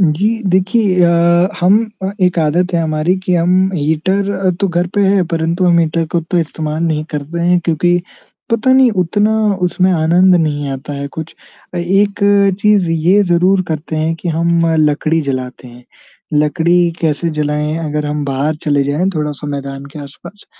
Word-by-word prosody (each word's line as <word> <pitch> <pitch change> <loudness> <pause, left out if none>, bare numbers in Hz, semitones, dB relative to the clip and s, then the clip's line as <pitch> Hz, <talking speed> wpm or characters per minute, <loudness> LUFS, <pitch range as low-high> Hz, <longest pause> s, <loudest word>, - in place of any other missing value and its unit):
जी 175 +3 +2 0.2
देखिए 190 0 +2
अ, 170 +1 +3
हम 190 +4 +4 0.2
अ 190 - -2
एक 180 -1 +2
आदत 175 +4 0
है 170 - +2
हमारी 155 +3 0
कि 180 - +1
हम 185 +3 +2
हीटर 185 +5 0
तो 195 - +1
घर 175 0 0
पे 205 - +1
है 195 -1 +3
परंतु 165 +2 0
हम 175 -1 +4
हीटर 165 0 0
को 170 - +2
तो 170 +2 -2
इस्तेमाल 155 -1 -3
नहीं 155 -2 -1
करते 150 +3 -5
हैं 175 +1 +2
क्योंकि 175 +2 +1 0.5
पता 230 +3 +2
नहीं 260 -2 +5
उतना 205 +5 0 0.3
उसमें 185 +1 +1
आनंद 175 +3 +3
नहीं 150 -4 0
आता 135 +2 -6
है 140 0 -5
कुछ। 160 +2 -8 0.4
अ, - - -3
एक 195 +4 0 0.4
चीज़ 210 -4 +3
ये 175 +5 +3
ज़रूर 180 +2 +2
करते 160 0 -4
हैं 160 +1 -1
कि 175 - -4
हम 170 +1 +1 0.3
लकड़ी 155 +2 -1
जलाते 130 -1 -5
हैं, 120 0 -15 0.5
लकड़ी 170 +3 +2
कैसे 165 +1 -1
जलाएँ 150 +1 -1
अगर 150 -2 -3
हम 150 0 -3
बाहर 140 +3 -2
चले 145 -2 +1
जाएँ 150 +7 0
थोड़ा-सा 150 -2 -4
मैदान 140 -1 -6
के 150 - -9
आस-पास 145 +8 -13
170 Hz, 170 wpm, -15 LUFS, 150-185 Hz, 0.5 s, नहीं